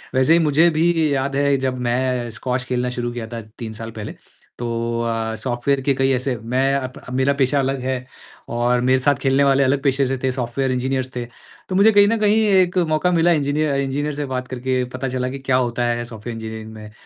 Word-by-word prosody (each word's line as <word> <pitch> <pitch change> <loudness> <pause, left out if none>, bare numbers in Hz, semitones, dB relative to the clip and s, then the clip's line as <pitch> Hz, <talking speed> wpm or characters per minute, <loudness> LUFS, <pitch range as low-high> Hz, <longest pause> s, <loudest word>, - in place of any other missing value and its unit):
वैसे 130 +5 +4
ही 170 - +5
मुझे 160 +2 +4
भी 160 -1 +2
याद 135 +1 -1
है 140 0 +2
जब 130 -1 -2
मैं 125 0 0
स्क्वाश 125 +3 -2
खेलना 125 -1 -1
शुरू 120 -1 -3
किया 115 -2 -5
था, 115 0 -6 0.2
तीन 115 -2 -5
साल 115 +1 -7
पहले, 110 -2 -7 0.5
तो 115 0 -2
अ, 115 -1 -2
सॉफ़्टवेयर 125 +4 -1
के 140 +1 +2
कई 135 0 +2
ऐसे 130 0 -1
मैं 130 +5 0
अब 130 -2 -4
अब 125 - -7
मेरा 130 +2 +2
पेशा 140 +1 +1
अलग 135 0 0
है 130 -1 -3 0.4
और 120 +1 +1
मेरे 130 +1 +3
साथ 145 +2 +3
खेलने 135 +1 +3
वाले 140 0 +4
अलग 135 +1 +1
पेशे 135 0 +2
से 130 +1 -1
थे, 130 - +2
सॉफ़्टवेयर 130 +1 -2
इंजीनियर्स 130 0 -2
थे, 120 - -3 0.4
तो 185 - -2
मुझे 200 +3 +6
कहीं 205 -1 +6
न 230 +2 +2
कहीं 210 +1 +3
एक 185 -2 +3
मौका 155 +4 +2
मिला 170 0 +3
इंजीनिय 150 -1 +1
इंजीनियर 145 +2 -2
से 145 - -3
बात 130 -1 -4
करके 130 0 -1
पता 130 +1 -3
चला 125 0 -2
कि 135 +1 -6
क्या 130 -1 0
होता 120 -1 0
है 120 0 -1
सॉफ़्टवेयर 115 0 -7
इंजीनियरिंग 110 0 -7
में 105 -1 -10
130 Hz, 220 wpm, -21 LUFS, 120-140 Hz, 0.5 s, मुझे